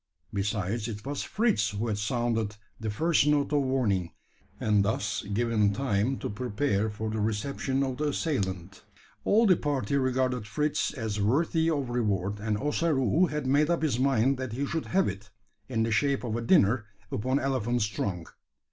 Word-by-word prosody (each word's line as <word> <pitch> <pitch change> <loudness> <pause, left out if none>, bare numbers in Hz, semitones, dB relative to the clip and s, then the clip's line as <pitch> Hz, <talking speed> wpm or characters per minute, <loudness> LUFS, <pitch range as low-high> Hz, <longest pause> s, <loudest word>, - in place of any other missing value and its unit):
Besides, 105 +2 -1
it 105 -2 -6
was 140 0 -3
Fritz 215 - +1
who 105 +3 -3
had 105 -2 -1
sounded 115 -1 -1 0.2
the 110 - -3
first 155 +7 +2
note 150 0 +2
of 145 - +3
warning, 115 -10 0 0.5
and 105 -2 +3
thus 100 0 -1
given 105 -2 +2
time 125 0 0
to - - -4
prepare 110 -1 0
for 110 +1 -4
the 110 - -2
reception 130 +5 -1
of 130 -2 -2
the 150 - -1
assailant. 100 - -2 0.4
All 220 +3 +4
of 220 - +4
the 180 - +6
party 140 -4 -1
regarded 130 -3 0
Fritz 150 +8 0
as 110 -5 -3
worthy 160 - +2
of 140 -6 -1
reward; 105 -4 -1
and 105 0 -1
Ossaroo 150 - +2
had 150 -2 -3
made 145 +4 +3
up 170 -2 +1
his 135 -6 +1
mind 135 0 +3
that 130 -3 -4
he 140 +4 -1
should 160 +2 -3
have 190 +1 +2
it, 100 +2 -6 0.4
in 115 -3 +1
the 115 - -1
shape 140 +5 +1
of 115 -3 -2
a 120 - -1
dinner 115 - +3 0.3
upon 130 +6 0
elephant's 120 -4 0
trunk. 90 -5 -3
120 Hz, 175 wpm, -28 LUFS, 105-140 Hz, 0.5 s, the